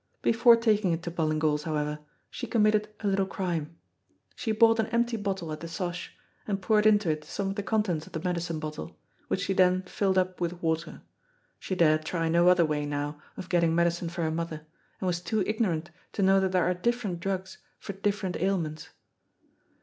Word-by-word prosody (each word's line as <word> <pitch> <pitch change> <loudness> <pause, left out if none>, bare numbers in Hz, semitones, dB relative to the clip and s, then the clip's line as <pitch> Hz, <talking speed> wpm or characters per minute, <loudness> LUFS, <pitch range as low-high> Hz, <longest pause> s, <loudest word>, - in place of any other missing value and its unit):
Before 235 +1 +6
taking 215 -6 +2
it 165 +1 -3
to 170 - -4
Ballingall's, 155 -2 +1
however, 150 -1 -2 0.3
she - - -5
committed 215 -2 +2
a 210 - -1
little 195 -1 +1
crime. 170 -5 -3 0.6
She 225 - -2
bought 225 +1 +5
an 220 - +2
empty 235 0 +1
bottle 195 -6 -3
at 155 - -5
the 165 - -7
'Sosh, 175 +1 -5 0.3
and 200 -2 -1
poured 210 +2 +3
into 205 -5 +4
it 155 0 -3
some 195 +6 -3
of - - -5
the 205 - -2
contents 200 -7 -1
of - - -16
the 160 - -2
medicine 175 -2 -2
bottle, 155 - -6 0.3
which - - -1
she 195 - 0
then 185 0 +3
filled 190 +1 0
up 185 -1 0
with 175 0 -2
water. 160 0 -2 0.6
She 185 - -3
dared 155 -3 +3
try 165 +1 -1
no 170 +2 +4
other 180 -2 +6
way 150 -1 -1
now 145 +1 -3 0.2
of 185 - -6
getting 170 -3 +2
medicine 170 0 +1
for 170 0 -3
her 160 - 0
mother, 160 -1 -4 0.3
and - - -4
was 175 -1 0
too 215 +2 0
ignorant 175 -7 -1 0.2
to 200 - 0
know 195 0 +5
that 190 -1 +1
there 185 -2 +2
are 180 - +2
different 210 -2 -1
drugs 190 +1 -4 0.2
for 200 - -7
different 195 -1 -1
ailments. 165 -4 -2
180 Hz, 195 wpm, -28 LUFS, 165-200 Hz, 0.6 s, Before